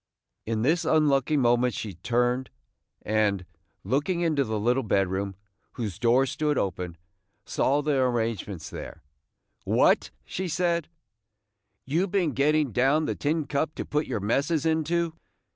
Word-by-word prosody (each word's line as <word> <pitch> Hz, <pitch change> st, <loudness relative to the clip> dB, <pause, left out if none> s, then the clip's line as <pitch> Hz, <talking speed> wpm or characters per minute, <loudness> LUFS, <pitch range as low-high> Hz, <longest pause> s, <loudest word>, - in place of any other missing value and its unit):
In 110 Hz, -1 st, -1 dB
this 160 Hz, +6 st, +2 dB
unlucky 150 Hz, -1 st, +3 dB
moment 120 Hz, -2 st, +3 dB
she 105 Hz, -3 st, -5 dB
turned, 120 Hz, +7 st, 0 dB, 0.5 s
and, 105 Hz, -3 st, +1 dB, 0.4 s
looking 145 Hz, -, 0 dB
into 155 Hz, -5 st, +2 dB
the 110 Hz, -3 st, -2 dB
little 120 Hz, +5 st, +2 dB
bedroom, 95 Hz, -3 st, 0 dB, 0.4 s
whose 105 Hz, -8 st, -4 dB
door 120 Hz, +3 st, +4 dB
stood 150 Hz, +2 st, -1 dB
open, 90 Hz, -3 st, -2 dB, 0.5 s
saw 145 Hz, +3 st, +1 dB
the 145 Hz, -2 st, +1 dB
arrangements 110 Hz, -8 st, -2 dB
there. -, -, -8 dB, 0.6 s
"What!" -, -, +3 dB, 0.2 s
she 190 Hz, +1 st, -4 dB
said; 170 Hz, -1 st, 0 dB, 1.0 s
"you 165 Hz, +8 st, +1 dB
been 180 Hz, -5 st, +1 dB
getting 145 Hz, +1 st, +2 dB
down 135 Hz, +7 st, +2 dB
the -, -, -1 dB
tin 155 Hz, +1 st, -1 dB
cup 150 Hz, +2 st, -1 dB
to -, -, -4 dB
put 150 Hz, +1 st, -1 dB
your -, -, -2 dB
messes 140 Hz, -, 0 dB
into? 160 Hz, +1 st, +1 dB
135 Hz, 135 wpm, -26 LUFS, 110-155 Hz, 1.0 s, door